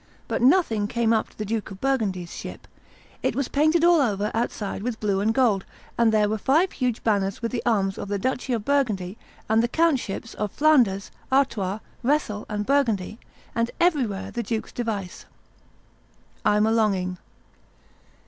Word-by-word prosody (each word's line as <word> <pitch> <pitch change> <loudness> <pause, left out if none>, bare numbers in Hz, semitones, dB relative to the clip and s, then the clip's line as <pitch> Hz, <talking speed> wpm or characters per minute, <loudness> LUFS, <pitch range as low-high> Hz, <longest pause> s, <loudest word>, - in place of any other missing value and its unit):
But - - -2
nothing 245 - +3
came 230 0 +1
up 220 - 0
to - - -25
the 215 - -3
Duke 220 +1 -2
of 195 -1 -10
Burgundy's 205 -10 -1
ship; - - -8 0.5
it - - 0
was 275 -2 0
painted 310 +3 +2
all 345 -2 +6
over 210 -4 0
outside 220 -4 -2
with 235 +1 -3
blue 200 -2 0
and 210 +3 +2
gold, 225 -6 +2 0.3
and 235 -1 +3
there 215 -1 +3
were 215 +1 -1
five 320 - +3
huge 250 -4 -2
banners 200 -1 0
with 230 - -1
the 245 - -2
arms 195 -4 +1
of - - -5
the 205 0 -1
duchy 255 +4 -2
of 220 -3 -2
Burgundy 215 -10 0 0.3
and 220 +1 +3
the 235 - +1
countships 260 -7 0
of 210 -2 -3
Flanders, 245 -11 +3 0.2
Artois, 220 -8 +1 0.2
Rethel, 250 -6 0
and 210 0 -2
Burgundy, 225 -7 +1 0.3
and 230 0 0
everywhere 265 - +1
the 240 - -2
duke's 225 0 -3
device, 210 -6 -4 1.2
'I'm 210 +1 +3
a 220 - +2
longing. 190 -5 +1
225 Hz, 165 wpm, -24 LUFS, 205-260 Hz, 1.2 s, all